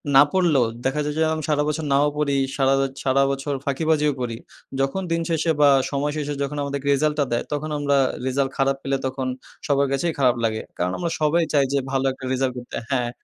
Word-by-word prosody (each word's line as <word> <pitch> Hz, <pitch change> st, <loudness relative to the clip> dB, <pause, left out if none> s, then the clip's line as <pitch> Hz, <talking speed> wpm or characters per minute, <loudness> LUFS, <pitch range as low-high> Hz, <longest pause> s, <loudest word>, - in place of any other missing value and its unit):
না 135 Hz, -, +10 dB
পড়লেও 160 Hz, -10 st, +3 dB, 0.2 s
দেখা 145 Hz, +3 st, +1 dB
যায় 150 Hz, 0 st, -3 dB
যে -, -, +4 dB
আমি 155 Hz, -1 st, -4 dB
সারা 150 Hz, -1 st, +2 dB
বছর 155 Hz, 0 st, -2 dB
নাও 145 Hz, +2 st, +4 dB
পড়ি 140 Hz, -2 st, +1 dB, 0.2 s
সারা 135 Hz, 0 st, +3 dB, 0.3 s
সারা 135 Hz, +1 st, +3 dB
বছর 140 Hz, +1 st, -3 dB
ফাঁকিবাজিও 150 Hz, +1 st, +1 dB
করি। 115 Hz, -2 st, -3 dB, 0.4 s
যখন 135 Hz, +8 st, 0 dB
দিন 165 Hz, 0 st, +1 dB
শেষে 165 Hz, 0 st, +1 dB
বা 145 Hz, -, +7 dB, 0.2 s
সময় 145 Hz, +1 st, -1 dB
শেষে 145 Hz, -1 st, -2 dB
যখন 145 Hz, +1 st, -4 dB
আমাদের 140 Hz, 0 st, -3 dB
কে -, -, -5 dB
রেজাল্টটা 150 Hz, +1 st, +1 dB
দেয়, 120 Hz, -, 0 dB
তখন 150 Hz, +1 st, -3 dB
আমরা 140 Hz, -1 st, +1 dB, 0.3 s
রেজাল্ট 135 Hz, +1 st, 0 dB
খারাপ 135 Hz, 0 st, +2 dB
পেলে 135 Hz, 0 st, 0 dB
তখন 130 Hz, 0 st, -2 dB, 0.4 s
সবার 140 Hz, -1 st, +2 dB
কাছেই 155 Hz, +4 st, 0 dB
খারাপ 125 Hz, -2 st, +4 dB
লাগে। 110 Hz, -1 st, 0 dB, 0.2 s
কারণ 90 Hz, +1 st, 0 dB
আমরা 170 Hz, -, -2 dB
সবাই 160 Hz, +3 st, +3 dB
চাই 140 Hz, -2 st, +4 dB
যে 140 Hz, -, +3 dB
ভালো 135 Hz, 0 st, 0 dB
একটা 130 Hz, 0 st, -9 dB
রেজাল্ট 130 Hz, 0 st, 0 dB
করতে। 125 Hz, 0 st, -8 dB, 0.2 s
হ্যাঁ, 125 Hz, -3 st, +1 dB
140 Hz, 210 wpm, -23 LUFS, 135-150 Hz, 0.4 s, না